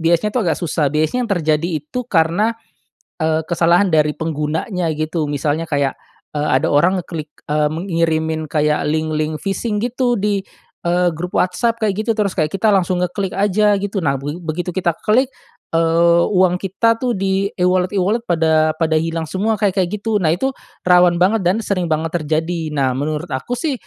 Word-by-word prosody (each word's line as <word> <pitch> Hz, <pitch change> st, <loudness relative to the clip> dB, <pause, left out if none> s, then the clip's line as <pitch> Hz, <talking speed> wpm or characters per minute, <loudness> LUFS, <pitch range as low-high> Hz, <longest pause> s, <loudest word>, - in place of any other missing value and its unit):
biasanya 170 Hz, +6 st, +2 dB
tuh 250 Hz, -, +1 dB
agak -, -, +1 dB
susah 160 Hz, -4 st, 0 dB
biasanya 155 Hz, -, 0 dB
yang -, -, 0 dB
terjadi 155 Hz, +1 st, +1 dB, 0.2 s
itu 250 Hz, +11 st, -4 dB
karena, 175 Hz, +7 st, +2 dB, 0.7 s
eee, 160 Hz, 0 st, +2 dB
kesalahan 175 Hz, +3 st, +3 dB
dari 155 Hz, -3 st, +3 dB
penggunanya 160 Hz, +3 st, -2 dB
gitu 155 Hz, +1 st, -1 dB
misalnya 145 Hz, +3 st, -1 dB
kayak, 140 Hz, -4 st, -1 dB, 0.4 s
eee, 150 Hz, 0 st, 0 dB
ada -, -, 0 dB
orang 180 Hz, +6 st, +3 dB
ngeklik, 155 Hz, -3 st, -7 dB, 0.2 s
eee, 150 Hz, 0 st, +1 dB
mengirimin 160 Hz, -3 st, -1 dB
kayak 150 Hz, -1 st, +1 dB
link-link 155 Hz, 0 st, -1 dB
phishing 210 Hz, +2 st, -2 dB
gitu 245 Hz, 0 st, 0 dB
di, 200 Hz, -1 st, 0 dB, 0.4 s
eee, 175 Hz, +1 st, +2 dB
grup 180 Hz, +3 st, -2 dB
WhatsApp 230 Hz, +6 st, 0 dB
kayak 215 Hz, -1 st, 0 dB
gitu 230 Hz, -, +1 dB
terus 210 Hz, -3 st, -1 dB
kayak 155 Hz, -4 st, 0 dB
kita 195 Hz, +3 st, 0 dB
langsung 185 Hz, -3 st, +2 dB
ngeklik 185 Hz, +2 st, -2 dB
aja 205 Hz, +1 st, +2 dB
gitu 195 Hz, -1 st, -3 dB
nah 140 Hz, -2 st, 0 dB
be 145 Hz, +3 st, -4 dB
begitu 170 Hz, +2 st, -4 dB
kita 180 Hz, -2 st, +1 dB, 0.2 s
klik, 255 Hz, +5 st, +3 dB, 0.4 s
eee, 170 Hz, +1 st, +4 dB
uang 185 Hz, -2 st, +3 dB
kita 225 Hz, +4 st, +1 dB
tuh 245 Hz, -4 st, 0 dB
di 195 Hz, +1 st, 0 dB
e-wallet-e-wallet 185 Hz, +4 st, +1 dB
pada 160 Hz, -2 st, +3 dB
pada 160 Hz, -1 st, +1 dB
hilang 165 Hz, 0 st, -2 dB
semua 205 Hz, +7 st, -1 dB
kayak-kayak 190 Hz, -3 st, +1 dB
gitu. 210 Hz, -1 st, -1 dB
Nah 160 Hz, -, +2 dB
itu 230 Hz, +12 st, 0 dB, 0.3 s
rawan 180 Hz, -1 st, +5 dB
banget 195 Hz, +5 st, +3 dB
dan 185 Hz, +4 st, +2 dB
sering 180 Hz, -4 st, -1 dB
banget 160 Hz, +1 st, -1 dB
terjadi 160 Hz, +1 st, -1 dB
nah 135 Hz, -4 st, 0 dB
menurut 150 Hz, +5 st, -2 dB
aku 245 Hz, -, -3 dB
sih, 295 Hz, +3 st, -1 dB
175 Hz, 170 wpm, -18 LUFS, 155-200 Hz, 0.7 s, rawan